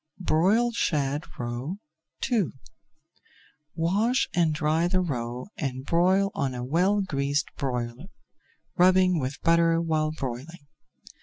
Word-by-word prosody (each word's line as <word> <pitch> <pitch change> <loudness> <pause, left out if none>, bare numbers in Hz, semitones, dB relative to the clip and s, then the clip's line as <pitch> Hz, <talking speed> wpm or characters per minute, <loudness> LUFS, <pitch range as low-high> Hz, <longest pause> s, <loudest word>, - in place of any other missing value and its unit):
BROILED 195 +7 +2
SHAD 145 -7 0
ROE 120 +9 -4 0.5
II 220 -6 +3 1.3
Wash 210 +10 +1
and 170 -3 +2
dry 155 +2 +1
the 185 +1 +1
roe 125 -7 -3
and 130 -4 -3
broil 185 +5 +3
on 135 -2 -2
a 125 - -4
well 185 +9 +2
greased 145 -4 0
broiler, 125 +2 -3 0.7
rubbing 185 -1 +4
with 135 +1 -4
butter 165 0 +4
while 155 -2 0
broiling. 145 +2 -6
160 Hz, 110 wpm, -26 LUFS, 135-185 Hz, 1.3 s, rubbing